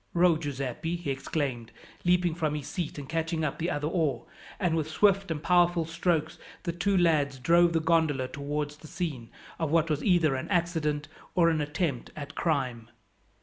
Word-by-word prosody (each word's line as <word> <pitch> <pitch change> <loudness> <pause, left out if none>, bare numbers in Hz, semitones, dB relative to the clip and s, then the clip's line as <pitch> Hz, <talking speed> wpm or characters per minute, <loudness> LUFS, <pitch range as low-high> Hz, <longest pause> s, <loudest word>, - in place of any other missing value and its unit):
"Row, 175 -1 +5
Giuseppi!" 145 +1 -3
he 170 -5 -3
exclaimed, 135 -4 -3 0.3
leaping 180 -1 +3
from 155 -3 -1
his 145 -2 -4
seat 155 +1 -4
and 140 -2 -6
catching 165 +1 -1
up 140 - -3
the 170 +2 0
other 145 -3 -2
oar; 155 -8 0 0.3
and 175 -4 +1
with 155 -1 -1
swift 195 +3 +3
and 155 -2 -3
powerful 175 -1 +3
strokes 165 -1 -1 0.2
the 170 - -1
two 180 +3 +1
lads 150 -6 +2
drove 170 +6 +4
the 165 - +3
gondola 160 -5 +2
towards 145 +2 -4
the 155 - -13
scene 145 -10 -4 0.3
of 160 -2 0
what 165 0 +2
was 150 - -1
either 175 -7 +3
an 130 - -4
accident, 160 -5 0 0.3
or 170 -2 +5
an 155 -2 0
attempt 145 -3 -2
at 145 -1 -7
crime. 130 -9 -1
160 Hz, 180 wpm, -28 LUFS, 145-170 Hz, 0.3 s, Row